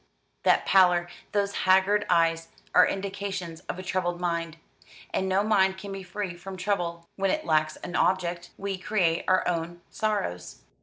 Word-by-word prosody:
"That - - +3
pallor, 180 -2 +5 0.2
those 200 -1 0
haggard 190 +3 +3
eyes 165 -1 +2 0.3
are - - +7
indications 195 -4 -4
of - - -3
a 185 - -6
troubled 180 -1 -1
mind; 170 -2 -2 0.6
and 190 - 0
no 190 +2 +2
mind 190 -3 +3
can 200 +1 -8
be 195 0 -5
free 185 0 -4
from 190 +2 -8
trouble 175 -3 -2
when 195 0 +1
it - - -1
lacks 155 -1 +2
an 175 - -7
object. 175 -2 0
We 195 -1 -4
create 180 -4 +1
our 185 0 +3
own 175 0 -2
sorrows." 90 - -3
185 Hz, 160 wpm, -27 LUFS, 170-195 Hz, 0.6 s, are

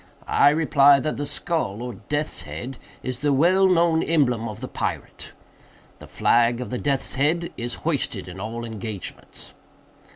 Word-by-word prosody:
I 140 - +5
reply 145 -2 +5
that 155 +3 -2
the 145 - -2
skull, 145 - -2
or 125 -1 -5
death's 145 +9 -2
head, 130 +1 -7 0.2
is 130 -1 -3
the 145 +1 +1
well 180 +7 +4
known 170 -3 +3
emblem 125 -8 +1
of 105 0 -8
the 130 - -5
pirate. - - -5 0.7
The - - -12
flag 120 0 +2
of 125 - -6
the 125 - -2
death's 140 -2 -1
head 160 +5 0
is 120 +1 -4
hoisted 135 - -1
in 90 +1 -9
all 115 +3 -5
engagements. 110 -4 -7
135 Hz, 160 wpm, -23 LUFS, 115-155 Hz, 0.7 s, I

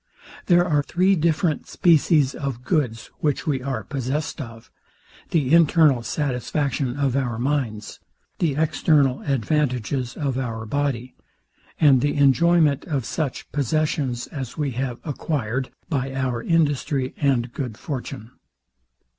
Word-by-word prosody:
There 175 -1 +5
are 150 -4 +2 0.4
different 160 0 +1
species 155 -5 +3
of 135 -4 -5
goods, 125 -8 -1
which 145 -3 0
we 140 -5 0
are 130 -5 -3
possessed 140 - -3
of; 115 -3 -10 0.6
the 145 -4 +1
internal 160 -5 +5
satisfaction 135 0 -1
of 140 -3 0
our 125 -4 -1
minds, 120 -5 -2 0.4
the 155 -6 +1
external 150 -3 +2
advantages 130 -2 -1
of 135 -4 -1
our 115 -3 -4
body, 130 0 -2 0.7
and 140 -5 +5
the 145 +2 0
enjoyment 150 +1 +4
of 140 -8 -2
such 150 -1 -4
possessions 145 -3 -1
as 135 -5 -7
we 145 -3 -1
have 125 0 -3
acquired 130 -4 -2 0.2
by 135 -2 -2
our 130 -3 -1
industry 145 -4 0
and 125 -4 +1
good 125 -6 -4
fortune. 125 -4 -6
135 Hz, 120 wpm, -23 LUFS, 125-150 Hz, 0.7 s, There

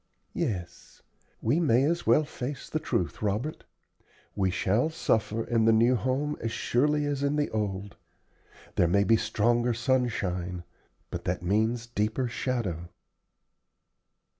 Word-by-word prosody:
"Yes; 90 -6 -4 0.4
we 135 +9 +2
may 130 -6 +3
as 170 +4 0
well 155 - +5
face 140 -1 -6
the 155 - 0
truth, 90 - -2
Robert. 110 +9 -2 0.7
We 95 -2 +1
shall 100 - +1
suffer 110 -8 0
in 115 -1 +1
the 115 - +6
new 115 +3 +4
home 135 +5 -1
as 115 - -2
surely 150 +6 +1
as 145 -1 -1
in 140 +1 +1
the 150 -1 0
old. 100 -2 -3 0.8
There 85 - +4
may 100 +4 +3
be 115 +3 +4
stronger 115 +2 +1
sunshine, 100 -8 -1 0.5
but - - -5
that 90 0 -1
means 110 +5 +1
deeper 115 +2 -1
shadow." 115 -9 -3
115 Hz, 135 wpm, -28 LUFS, 100-130 Hz, 0.8 s, the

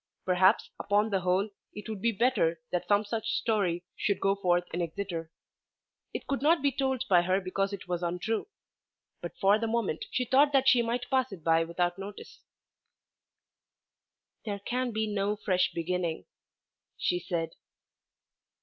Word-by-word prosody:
Perhaps 185 +3 +3
upon 210 +2 +1
the 195 - +2
whole 185 +3 +1 0.3
it 210 +1 -7
would 215 -3 -5
be 235 - +2
better 195 -8 +1
that 180 - -2
some 205 +1 +3
such 220 +2 -3
story 190 -6 0
should 200 -2 0
go 195 - +2
forth 175 -3 +1
in 175 - -1
Exeter. 170 -1 -4 0.8
It - - -5
could 275 - -2
not 310 0 +3
be 280 - +3
told 265 -1 -1
by 180 -3 +5
her 185 +2 +1
because 195 +1 -1
it 200 -2 -7
was 175 -1 -2
untrue; 180 - -2 0.7
but 175 -2 -7
for 200 +2 +4
the 230 - -1
moment 225 -8 -1
she 250 - -1
thought 285 +4 +4
that 270 -1 +3
she 250 -2 +6
might 240 +2 -2
pass 260 -1 +2
it 180 -5 -9
by 165 0 +4
without 175 +2 -1
notice. 200 +1 -9 2.0
"There 205 -3 -3
can 245 +5 -2
be 220 0 0
no 205 -1 -1
fresh 185 -3 +1
beginning," 170 -1 -2 0.7
she 355 - 0
said. 170 - -3
200 Hz, 160 wpm, -29 LUFS, 180-230 Hz, 2.0 s, she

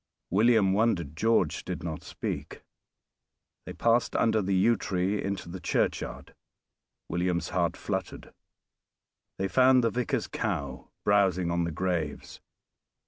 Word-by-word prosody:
William 105 -1 +4
wondered 95 -9 +1
George 115 +7 +1
did - - -5
not 80 -3 -4
speak. - - -6 1.0
They - - -5
passed 115 +1 +1
under 110 -1 +3
the 95 0 0
yewtree 95 -1 +1
into 100 -2 -3
the 90 +2 -7
churchyard. 85 - -2 0.7
William's 85 -1 -1
heart 90 -1 0
fluttered. 95 -3 -5 1.0
They 95 - -1
found 130 +3 +5
the 115 - +2
vicar's 125 0 -1
cow 65 -2 -4
browsing 95 -4 +2
on 85 0 0
the 85 - -3
graves. 80 -3 -3
95 Hz, 120 wpm, -28 LUFS, 85-110 Hz, 1.0 s, found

